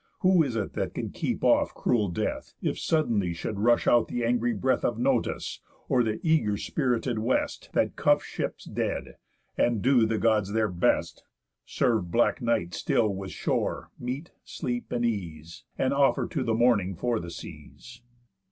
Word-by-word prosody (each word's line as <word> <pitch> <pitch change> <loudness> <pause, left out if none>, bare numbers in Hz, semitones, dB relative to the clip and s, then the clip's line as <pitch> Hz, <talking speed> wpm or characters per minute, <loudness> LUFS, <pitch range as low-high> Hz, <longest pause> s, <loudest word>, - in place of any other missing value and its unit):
Who 185 -2 +5
is 135 -7 -1
it 110 -3 -2
that - - -3
can - - -4
keep - - -3
off - - +3
cruel 115 -5 +1
Death, 85 - -3
If - - -2
suddenly 110 - +1
should 100 +4 -4
rush 120 +3 +3
out 120 -1 +4
th' 120 - -3
angry 120 0 +1
breath 125 +4 0
Of 120 - 0
Notus, 125 -1 0 0.3
or 125 - +3
the 110 -2 -1
eager 155 -11 +2
spirited 125 -2 -1
West, 115 +4 -1
That - - +1
cuff - - +3
ships - - -5
dead, - - -3 0.4
and 115 -4 +2
do 125 -4 +4
the 110 0 0
Gods 105 -3 +1
their 110 -1 +1
best? 90 -1 0 0.4
Serve 115 -9 +1
black 120 +7 +2
Night 115 -8 0
still 110 -3 +1
with 95 -1 -5
shore, - - -2
meat, 130 +7 -5
sleep, 120 -1 -4
and 120 0 0
ease, 85 -8 -4
And 130 +1 +1
offer 140 -1 +3
to 145 -7 -2
the 115 -2 0
Morning 110 -6 +2
for 120 +4 -1
the 85 - -7
seas. 120 +7 -11
115 Hz, 170 wpm, -27 LUFS, 105-125 Hz, 0.4 s, Who